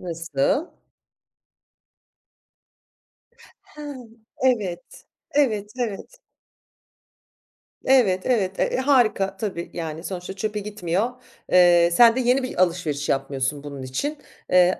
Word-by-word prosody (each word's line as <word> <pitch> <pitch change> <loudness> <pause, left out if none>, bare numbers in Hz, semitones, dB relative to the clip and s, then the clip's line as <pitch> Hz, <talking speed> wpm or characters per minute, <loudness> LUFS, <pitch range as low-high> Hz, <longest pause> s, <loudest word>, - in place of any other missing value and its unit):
Nasıl? 170 - -1 3.0
Ha, 300 - -13 0.6
evet. 205 -9 -1 0.3
Evet, 215 -8 +1
evet. 235 - -4 1.7
Evet, 225 -9 +4
evet. 195 -7 0
E, - - +1
harika 245 -8 +2
tabii. 190 -4 -4
Yani, 165 -1 -5
sonuçta 185 -1 -5
çöpe 210 +2 -3
gitmiyor. 205 +1 -2 0.4
Eee, 175 -1 +6
sen 235 +5 +6
de - - +1
yeni 250 +2 +2
bir 220 -8 0
alışveriş 165 -5 -1
yapmıyorsun 135 +1 -1
bunun 140 -2 -7
için. 280 - -3 0.3
Eee, 180 0 +4
190 Hz, 95 wpm, -23 LUFS, 170-235 Hz, 3.0 s, Eee